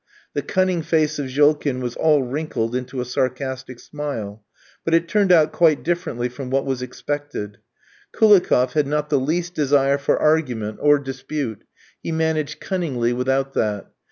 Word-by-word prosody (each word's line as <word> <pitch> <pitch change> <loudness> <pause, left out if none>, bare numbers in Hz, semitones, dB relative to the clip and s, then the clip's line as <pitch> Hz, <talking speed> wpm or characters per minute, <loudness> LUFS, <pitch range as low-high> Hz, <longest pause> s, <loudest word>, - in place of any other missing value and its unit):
The - - -1
cunning 185 -3 0
face 155 -1 +1
of 140 - -2
Jolkin 145 0 +2
was 125 -1 -4
all 150 -3 +3
wrinkled 125 -3 -3
into 125 0 -3
a - - -3
sarcastic 130 0 -3
smile; 115 -9 -6 0.4
but 165 - +2
it 165 0 +2
turned 200 0 +2
out 155 -3 +5
quite 160 -4 +3
differently 160 -8 -1
from 125 +1 -7
what 135 +1 0
was 135 -2 -2
expected. 125 -5 -5 0.5
Koulikoff 185 - +4
had 150 -2 +1
not 150 +1 -1
the 145 - +3
least 170 +6 -1
desire 140 -2 +2
for 140 - +1
argument 125 -9 0
or 145 0 +5
dispute, 135 -3 -5 0.4
he - - -4
managed 160 -2 -1
cunningly 135 -11 -1
without 135 +2 0
that. 105 -4 -2
140 Hz, 155 wpm, -21 LUFS, 125-155 Hz, 0.5 s, out